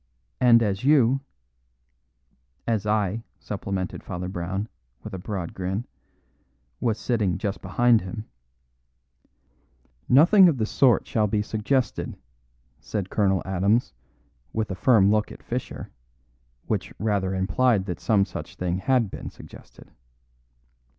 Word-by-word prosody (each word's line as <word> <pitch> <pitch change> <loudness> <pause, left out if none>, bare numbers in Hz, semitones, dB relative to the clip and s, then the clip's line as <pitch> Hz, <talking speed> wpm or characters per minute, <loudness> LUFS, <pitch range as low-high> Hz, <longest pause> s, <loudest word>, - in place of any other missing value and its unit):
And 115 -2 +6
as 100 -1 -1
you 135 -2 +4 0.7
" - - -45
"As 105 -1 -4
I," 105 0 0 0.2
supplemented 95 -2 -4
Father 90 -1 -5
Brown, 95 +3 -3 0.4
with - - -8
a 95 - -4
broad 90 -2 -5
grin, 95 +5 -3 0.9
"was 115 -3 0
sitting 105 -8 0
just 100 -1 -3
behind 115 +4 +3
him 100 +4 -6 1.0
" - - -39
"Nothing 185 +3 +7
of 150 - 0
the 110 - 0
sort 125 +2 +3
shall 105 -2 +1
be 105 0 0
suggested," 115 +5 -1 0.6
said 95 +5 -4
Colonel 95 -3 +2
Adams, 95 +5 +1 0.6
with 110 -2 -2
a - - -2
firm 105 -2 +4
look 105 -1 +1
at - - -12
Fischer, - - -5 0.7
which - - -2
rather 100 -3 0
implied 95 +3 +2
that 90 -4 -4
some 100 -3 +2
such - - -8
thing 90 0 -2
had 120 -2 +1
been - - -6
suggested. - - -15
100 Hz, 130 wpm, -25 LUFS, 95-115 Hz, 1.0 s, Nothing